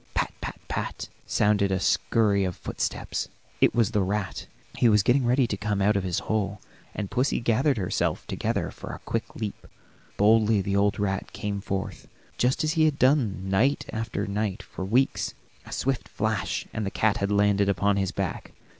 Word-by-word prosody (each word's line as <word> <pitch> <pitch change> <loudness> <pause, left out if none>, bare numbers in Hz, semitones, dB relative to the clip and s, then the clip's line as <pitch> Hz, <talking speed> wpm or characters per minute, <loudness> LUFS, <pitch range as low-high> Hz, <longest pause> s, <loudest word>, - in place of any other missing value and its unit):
"Pat, - - 0
pat, - - -5
pat," - - -4 0.2
sounded 100 -2 +2
a 95 - +1
scurry 100 0 +2
of 90 -2 -2
footsteps; - - -3 0.3
it - - +4
was 115 -1 +3
the 105 -4 +2
rat. 95 0 -2 0.3
He 120 - +5
was 105 -2 +4
getting 125 +2 +3
ready 125 +2 +4
to 110 - -2
come 100 0 -1
out 100 +1 +3
of 100 - +1
his 90 -2 -1
hole, 105 -2 -1 0.4
and 105 -2 -4
pussy 130 +2 +1
gathered 120 +4 +2
herself 95 -4 -1
together - - -2
for - - -8
a - - -7
quick - - -3
leap. 105 -3 -5 0.5
Boldly 110 0 +4
the 100 +1 -1
old 100 0 +2
rat 95 -2 -2
came 100 0 -3
forth, 95 -1 -4 0.3
just 125 +4 +2
as 155 - +1
he 160 -1 +3
had 150 -3 +2
done 120 -8 +2
night 115 +9 +2
after 110 -2 -2
night 100 -1 -2
for - - -7
weeks. 120 +8 +1 0.3
A - - -10
swift 135 -2 -1
flash, 110 -2 -1
and 110 - -2
the 100 - -1
cat 110 +1 +1
had 100 0 -1
landed 100 -1 +3
upon 100 0 +2
his 95 -1 0
back. 95 -3 -4
105 Hz, 185 wpm, -26 LUFS, 100-115 Hz, 0.5 s, He